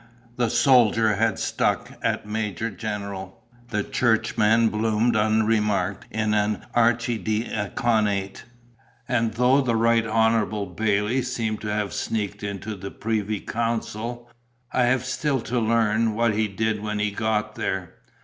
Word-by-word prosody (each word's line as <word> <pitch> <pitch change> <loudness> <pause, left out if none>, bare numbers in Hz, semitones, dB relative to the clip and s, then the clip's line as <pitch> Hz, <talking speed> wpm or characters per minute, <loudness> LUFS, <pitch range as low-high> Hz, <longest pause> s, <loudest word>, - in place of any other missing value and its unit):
The 120 -2 +1
soldier 115 -6 +4
had 110 -1 +1
stuck - - -1
at - - -1
Major 105 0 -3
General; 100 -1 -6 0.3
the 105 -3 -1
churchman 110 -1 +2
bloomed 110 +2 +1
unremarked 110 -1 +1
in 110 0 -1
an 105 0 0
archidiaconate; 110 -3 0 0.6
and 115 -2 0
though 125 +4 +4
the 120 -4 0
Right 115 0 +3
Honourable 110 -2 +1
Bailley 105 +6 0
seemed 115 -4 -3
to 105 - -3
have 105 -1 -2
sneaked 105 -3 -3
into 100 +1 -5
the 100 0 -7
privy 110 -1 -2
council, 115 +1 -3 0.4
I 125 - +2
have 130 0 +1
still 135 +2 0
to 120 +2 -1
learn 110 -1 +2
what 115 -1 +2
he 110 +1 +1
did 110 +1 -1
when 105 0 -3
he 105 0 0
had 100 - -14
got 105 -1 0
there. 95 -4 -3
110 Hz, 135 wpm, -24 LUFS, 105-115 Hz, 0.6 s, soldier